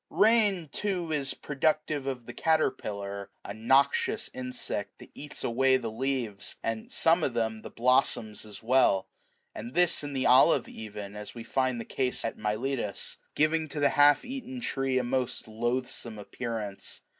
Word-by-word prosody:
Eain, 205 -8 +3
too, 180 -5 -2
is 140 -3 -1
productive 150 0 0
of 125 -3 -3
the 120 - -8
caterpillar, 100 -11 -1 0.2
a - - -5
noxious 135 +5 +2
insect 125 -5 -4
that - - -14
eats 150 - -5
away 130 +2 +3
the 115 -3 -4
leaves, 120 -4 -2
and, 115 -1 -3
some 165 +1 +3
of 125 - 0
them, 110 -1 0
the - - -8
blossoms 120 -3 +1
as 105 -2 -11
well; 115 -6 +4 0.5
and 120 +4 -7
this 175 -3 +3
in 145 -1 -5
the 130 -1 -1
olive 130 +2 +6
even, 105 -2 -8
as 105 +2 -8
we 115 - -6
find 130 0 0
the 115 - -5
case 130 -2 -1
at 115 - -2
Miletus; 110 0 -2 0.2
giving 155 +1 +2
to 150 0 -5
the 145 - +4
half 145 0 +5
eaten 260 0 -6
tree 135 - 0
a 130 - +2
most 125 -1 -2
loathsome 120 0 -3
appearance. 105 -2 -5
130 Hz, 160 wpm, -29 LUFS, 110-145 Hz, 0.5 s, olive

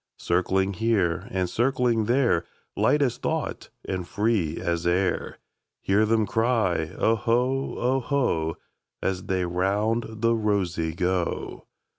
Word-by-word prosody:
Circling 95 +2 +1
here 95 -4 0
and 95 -4 -1
circling 120 +2 +1
there, 120 -7 +2 0.3
Light 145 -1 +3
as 125 -4 0
thought - - -3 0.2
and 95 -2 -3
free 105 -8 0
as 85 0 -1
air, 90 +2 0 0.4
Hear 105 +3 +2
them 110 -1 +2
cry, 110 -8 +1
"Oho, 120 +4 +1
oho,"As 115 - -2
they 95 -1 0
round 100 +6 0
the 115 +1 +1
rosey 95 -7 0
go. 90 0 -2
100 Hz, 110 wpm, -25 LUFS, 90-115 Hz, 0.4 s, Light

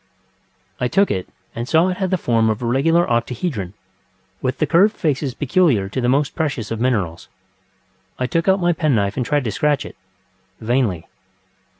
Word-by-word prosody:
I 125 - +1
took 195 +11 +2
it, 95 -2 -3 0.2
and 120 +3 -5
saw 165 +3 +4
it 180 - -3
had 190 -2 -1
the 185 - +1
form 115 -7 +1
of 110 +2 -2
a - - -1
regular 165 +8 +2
octahedron, 120 - -2 0.7
with 130 +1 -1
the 155 - +1
curved 185 +9 +3
faces 140 -4 -1
peculiar 145 - +2
to 130 - -3
the 120 - +1
most 145 +3 +1
precious 140 -10 -3
of 115 - -3
minerals. 100 -10 -1 0.9
I 130 - -1
took 165 +7 -1
out 190 +1 +4
my 175 -1 +2
penknife 115 -12 0
and 130 - -1
tried 145 +3 0
to 110 - -2
scratch 145 +7 0 0.7
itŌĆövainly. 110 -7 0
130 Hz, 175 wpm, -20 LUFS, 115-165 Hz, 0.9 s, saw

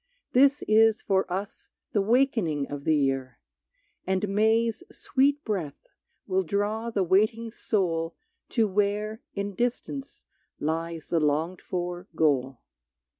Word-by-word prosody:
This 280 +3 +4
is 220 +1 +5
for 190 -4 0
us 195 +3 -5 0.2
the 205 - +2
wakening 215 - +2
of 145 -1 -6
the 160 - +4
year 135 -3 0 0.7
And 190 +2 0
May's 220 +2 +2
sweet 280 +2 +1
breath 180 - -3 0.4
will 190 -1 +1
draw 205 +5 -1
the 205 -4 0
waiting 215 +5 +2
soul 170 -7 -1 0.3
To 225 -3 +2
where 210 +3 -1
in 200 0 -3
distance 245 +5 -3 0.4
lies 165 +1 -3
the 170 - +2
longed 155 +4 0
for 180 0 -4
goal. 135 -5 +1
195 Hz, 125 wpm, -27 LUFS, 165-220 Hz, 0.7 s, is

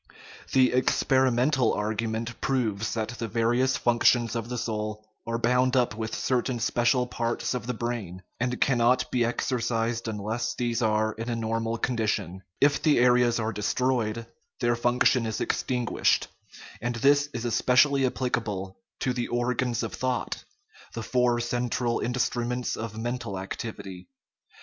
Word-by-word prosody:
The 130 -1 +4
experimental 130 0 +2
argument 110 +2 -3
proves 110 -6 -1
that 110 -1 -2
the 120 -1 -4
various 120 +4 +1
functions 120 0 +3
of 115 0 -3
the 125 - -3
soul 110 -2 -3 0.2
are 115 0 -1
bound 125 +2 +2
up 125 -3 +2
with 110 0 -4
certain 125 -1 0
special 120 +2 +2
parts 120 0 -2
of 125 -2 -4
the 125 - -2
brain, 110 -6 -4 0.2
and 125 +1 -1
cannot 125 -1 +2
be 125 -2 +2
exercised 115 -1 -1
unless 110 +2 -2
these 120 -1 -1
are 110 -1 +2
in 115 +3 -5
a 120 - -1
normal 115 0 -1
condition; 110 -7 -1 0.2
if 145 +1 +3
the 155 -2 +4
areas 120 -1 +4
are 110 0 -1
destroyed, 115 +1 0 0.3
their 120 -1 +2
function 120 0 +2
is 110 - -3
extin 125 -2 -1
guished; - - +2 0.6
and 120 +1 -2
this 145 +5 +3
is 120 -3 -4
especially 130 +3 +3
applicable 110 -7 -2 0.2
to 125 - +1
the 120 -1 -2
"or 120 +1 0
gans 125 -1 -1
of 115 - -4
thought," 130 -1 -2 0.5
the 115 - -5
four 125 0 +2
central 120 0 -1
instruments 125 0 -1
of 110 -1 -6
men 120 +3 -2
tal 100 -5 -5
activity. 95 -1 -7
120 Hz, 150 wpm, -27 LUFS, 110-125 Hz, 0.6 s, The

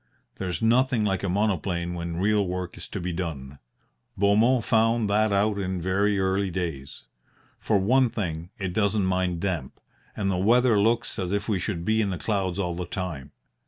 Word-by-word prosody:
There's 95 +3 -3
nothing 120 0 +3
like 95 -2 0
a 100 - -2
monoplane 90 -3 0
when 85 -1 -4
real 100 +1 +2
work 90 0 -4
is - - -7
to 100 - -4
be 90 0 -3
done. 70 -6 -5 0.6
Beaumont 110 +5 +3
found 115 0 +2
that 110 +1 +3
out 100 +1 +1
in 95 -1 -2
very 100 +3 +1
early 95 +1 +1
days. 80 -6 -5 0.6
For 105 - +1
one 125 +6 +3
thing, 85 -6 -4
it 95 -3 -3
doesn't 100 -1 +1
mind 90 -2 0
damp, 85 -9 -3 0.4
and 95 -2 0
the 90 - 0
weather 115 +3 +4
looks 115 +3 +1
as 90 -1 -2
if 100 0 -1
we 105 -4 0
should 85 -3 -3
be 110 0 +2
in 105 - 0
the 90 - -3
clouds 95 -2 -1
all 90 -3 -1
the 90 0 -5
time. 80 -8 -5
95 Hz, 185 wpm, -26 LUFS, 90-105 Hz, 0.6 s, weather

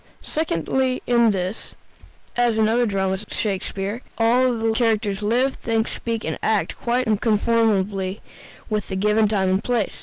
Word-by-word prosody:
Secondly, 260 - -1
in 235 -2 +4
this, 190 0 -3 0.6
as 240 -2 +2
in 220 - +4
the 215 - +2
other 240 +1 +3
dramas 190 -1 -1
of 210 - -14
Shakespeare, 200 +2 -3 0.2
all 245 +2 +3
the 225 0 0
characters 220 -3 0
live, 245 +6 +1
think, 225 -1 -1
speak, 230 -1 -4
and - - -3
act 220 -2 0
quite 245 +2 0
unconformably 210 -3 +1 0.5
with 215 -1 -2
the 190 - -4
given 210 +2 +3
time 195 -3 +1
and 190 +1 +1
place. 240 -5 -1
220 Hz, 155 wpm, -22 LUFS, 200-235 Hz, 0.6 s, in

